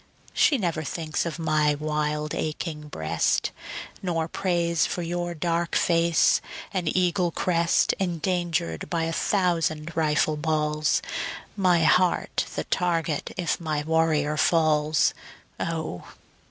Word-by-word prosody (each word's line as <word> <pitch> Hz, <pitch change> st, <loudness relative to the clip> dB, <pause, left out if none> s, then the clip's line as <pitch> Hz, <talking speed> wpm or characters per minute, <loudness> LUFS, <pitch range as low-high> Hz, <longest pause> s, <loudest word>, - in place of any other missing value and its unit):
She 290 Hz, -, +4 dB
never 170 Hz, -7 st, -1 dB
thinks 160 Hz, +2 st, -2 dB
of 165 Hz, -, -4 dB
my 155 Hz, -2 st, +2 dB
wild 150 Hz, 0 st, -2 dB
aching 155 Hz, -1 st, -4 dB
breast, 80 Hz, -, 0 dB, 0.5 s
Nor 165 Hz, -4 st, -1 dB
prays 170 Hz, -2 st, 0 dB
for 175 Hz, -, -3 dB
your 175 Hz, 0 st, -3 dB
dark 170 Hz, +1 st, -1 dB
face 170 Hz, -1 st, +3 dB, 0.3 s
and 180 Hz, -3 st, -1 dB
eagle 180 Hz, 0 st, +2 dB
crest 170 Hz, -1 st, +2 dB
Endangered 170 Hz, -, -1 dB
by 165 Hz, -2 st, 0 dB
a 165 Hz, 0 st, -1 dB
thousand 165 Hz, -5 st, 0 dB
rifle 155 Hz, -1 st, +2 dB
balls, 150 Hz, -1 st, 0 dB, 0.5 s
My 180 Hz, -4 st, +3 dB
heart 180 Hz, +2 st, +2 dB
the -, -, -1 dB
target 165 Hz, -4 st, -1 dB
if 175 Hz, -3 st, -1 dB
my 155 Hz, -3 st, -1 dB
warrior 155 Hz, -2 st, +1 dB
falls. 155 Hz, -2 st, +3 dB, 0.5 s
O! 160 Hz, -, -3 dB
165 Hz, 115 wpm, -25 LUFS, 150-175 Hz, 0.5 s, She